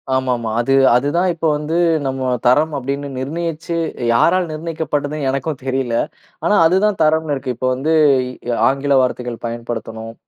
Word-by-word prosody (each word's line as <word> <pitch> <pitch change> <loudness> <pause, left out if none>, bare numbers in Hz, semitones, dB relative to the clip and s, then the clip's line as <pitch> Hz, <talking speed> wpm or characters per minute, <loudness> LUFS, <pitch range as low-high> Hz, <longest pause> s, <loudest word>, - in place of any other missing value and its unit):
ஆமாமா. 125 -4 -1
அது 135 +3 +1 0.2
அது 130 +3 +2
தான் 185 +1 +2
இப்ப 165 0 -5
வந்து, 150 +3 -2 0.3
நம்ம 130 -1 -2 0.2
தரம் 150 +5 +3
அப்படீன்னு 140 +2 -4
நிர்ணயிச்சு, 165 +3 -3 0.4
யாரால் 175 +8 +3
நிர்ணயிக்கப்படுதுணு 155 -2 -3
எனக்கும் 140 +1 -3
தெரியல. 130 -3 -1 0.5
ஆனா 210 - +3
அது 175 +3 +4
தான் 210 -2 0
தரம்னு 155 -1 +2
இருக்கு. 130 -2 -4
இப்போ 130 - -1
வந்து 150 +5 0 0.6
இ - - +1 0.2
ஆங்கில 140 +1 +1
வார்த்தைகள் 125 -2 -3
பயன்படுத்தணும். 115 -1 -6
140 Hz, 145 wpm, -18 LUFS, 125-160 Hz, 0.6 s, அது